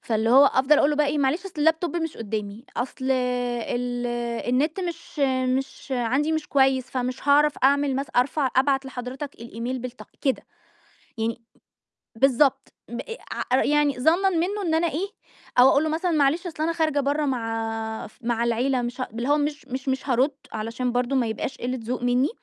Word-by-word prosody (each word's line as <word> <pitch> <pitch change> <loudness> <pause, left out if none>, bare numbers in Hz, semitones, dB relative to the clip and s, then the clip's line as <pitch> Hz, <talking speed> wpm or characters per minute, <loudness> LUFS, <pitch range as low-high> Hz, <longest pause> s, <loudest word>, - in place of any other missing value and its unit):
فاللي 225 0 0
هو 270 +3 +8
أفضَل 275 +3 +4
أقول 285 - +4
له 295 - 0
بقي 300 0 +3
إيه: 295 +1 0
"معلش 285 +7 +1
أصل 385 - -9
اللاب 320 +2 +4
توب 345 -2 -2
مش 325 -2 -3
قدامي، 215 +1 -5
أصل 260 +1 -4
ال 245 -1 -1 0.4
النت 300 +9 +1
مش 340 -3 -6 0.4
مش 270 +1 -7
عندي 265 +6 +1
مش 315 -1 -2
كويس، 265 -2 +3
فمش 255 +2 -3
هاعرف 295 +1 +5
أعمل 280 0 +3
مث 275 +1 -3
أرفع 265 +3 +2
أبعت 270 +1 +3
لحضرتك 260 +2 -6
الإيميل 235 +2 -5
بالتق" 250 0 -8
كده. 270 -2 +1 0.8
يعني 230 +1 -2 0.8
بالضبط، 270 +2 +3 0.2
ب 235 - -5 0.5
ع 260 - +4
يعني 295 -3 +2
ظَنًا 345 +8 +4
منه 375 +4 0
إن 330 -4 0
أنا 325 +2 +2
إيه 345 +6 -2 0.5
أو 250 - +9
أقول 280 +2 +4
له - - 0
مثلًا 330 +3 0
معلش 310 +2 +2
أصل 315 -3 -4
أنا 330 +1 +1
خارجة 310 -3 +1
برّا 290 +2 0
مع 225 -3 -3
مع 235 0 0
العيلة 245 +2 +1
مش 240 +2 -5
ه 255 - -2
اللي 235 +3 -3
هو 295 +1 +4
مش 290 -1 -2
مش 265 +1 -4
مش 265 +1 -1
هارد 260 +3 +3 0.2
علشان 230 +3 -2
برضه 245 +2 0
ما 250 -3 +2
يبقاش 220 +3 -4
قلّة 250 +1 -3
ذوق 240 +2 -3
مني، 245 +3 +2
265 Hz, 180 wpm, -25 LUFS, 245-295 Hz, 0.8 s, أو